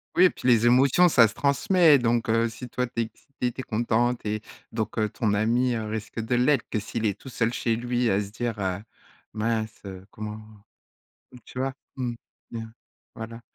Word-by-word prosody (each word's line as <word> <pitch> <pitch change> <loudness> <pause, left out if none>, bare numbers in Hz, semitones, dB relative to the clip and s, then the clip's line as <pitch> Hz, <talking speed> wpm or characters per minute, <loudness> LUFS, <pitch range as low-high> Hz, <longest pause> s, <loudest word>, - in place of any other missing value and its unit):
Oui, 180 - +6
et 185 - +7
puis - - -5
les 120 -1 +5
émotions, 135 +8 +5
ça 120 -8 +6
se - - -10
transmet, 150 +1 +4
donc 115 -1 +1
heu, 115 +1 +2
si 120 +3 -8
toi, 125 +1 -2
tu 115 0 -2
es - - +2
excité, 125 +2 -5
tu 130 - -6
es - - -8
content, 120 +2 +1
tu 110 - -9
es 110 - -5 0.3
donc 110 0 -3
heu, 110 -1 +2
ton 105 -1 -1
ami, 120 +4 +2
heu, 110 -1 -3
risque 110 +1 -5
de 115 +2 -2
l'être! 125 +1 +2
Que 110 - 0
s'il 110 +2 -4
est 100 -1 0
tout 135 - -10
seul, 115 -1 0
chez 115 -2 0
lui, 120 0 0
à 95 - +2
se 100 -1 -5
dire, 120 -1 -3
heu: 95 -1 -1 0.5
«Mince, 110 0 -2
heu, 95 -1 -8
comment?» 110 0 -7 0.9
donc 125 - -14
tu 125 - -9
vois? 135 0 -1 0.2
Mmh, 125 -2 -2 0.4
bien, 115 -1 -7 0.4
voilà, 115 +1 -7
115 Hz, 215 wpm, -26 LUFS, 110-125 Hz, 0.9 s, et